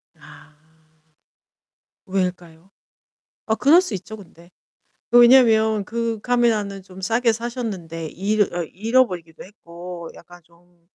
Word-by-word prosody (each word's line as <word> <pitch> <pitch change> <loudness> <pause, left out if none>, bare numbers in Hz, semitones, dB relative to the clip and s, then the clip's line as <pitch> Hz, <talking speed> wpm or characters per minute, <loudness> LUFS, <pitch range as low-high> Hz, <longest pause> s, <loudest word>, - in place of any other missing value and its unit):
아. 155 - -17 1.5
왜일까요? 180 -2 -4 0.7
아, 220 - 0
그럴 300 +10 +5
수 360 - -6
있죠, 195 +4 -9
근데. 170 -3 -17 0.6
그 240 - +7
왜냐면 220 -4 +5
그 230 0 -3
카메라는 220 -5 0
좀 185 0 -14
싸게 230 +5 +1
사셨는데 215 -9 -5
잃어 195 +1 -1
어, 175 - -1
잃어버리기도 185 -4 -1
했고 175 -3 -10
약간 175 0 -16
좀 170 +1 -29
195 Hz, 235 characters per minute, -21 LUFS, 175-230 Hz, 1.5 s, 그